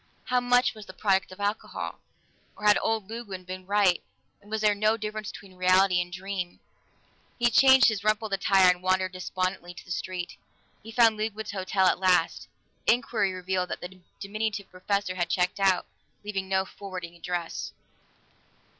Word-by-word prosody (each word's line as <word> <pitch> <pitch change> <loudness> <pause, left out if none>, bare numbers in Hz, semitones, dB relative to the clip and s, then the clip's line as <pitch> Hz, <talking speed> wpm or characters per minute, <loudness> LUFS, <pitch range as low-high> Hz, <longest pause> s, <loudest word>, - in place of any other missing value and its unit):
How 250 0 +1
much 245 0 +3
was 215 -2 -12
the - - -10
product 195 -3 +1
of 185 - -12
alcohol? 205 +1 -3 0.6
Or 210 - -8
had 210 0 +6
old 220 -3 -1
Ludwig 205 -5 -7
been 185 0 -8
right, 200 -3 +3 0.4
and 205 - -19
was 220 0 -2
there 210 -1 +4
no 215 +2 +2
difference 215 -1 -5
between 195 -2 -12
reality 185 0 +4
and 175 0 -6
dream? 185 -1 -5 0.8
He 240 0 +2
changed 265 +3 +7
his 215 -3 0
rumpled 215 0 0
attire 195 -1 +5
and 180 0 -5
wandered 185 0 +1
despondently 185 -1 -3
to - - -11
the 175 - -11
street. 180 0 -4 0.4
He 225 - -10
found 225 -1 +4
Ludwig's 215 0 -3
hotel 190 0 0
at 180 - +3
last; 185 -3 +2 0.4
inquiry 230 -4 +2
revealed 185 0 -2
that - - -4
the 185 +1 -9 0.2
diminutive 205 0 -3
professor 200 +1 -1
had 175 -2 -2
checked 180 +2 0
out, 190 -2 +3 0.4
leaving 195 -2 -4
no 190 0 +2
forwarding 185 -4 -8
address. 170 0 -4
195 Hz, 165 wpm, -27 LUFS, 185-215 Hz, 0.8 s, changed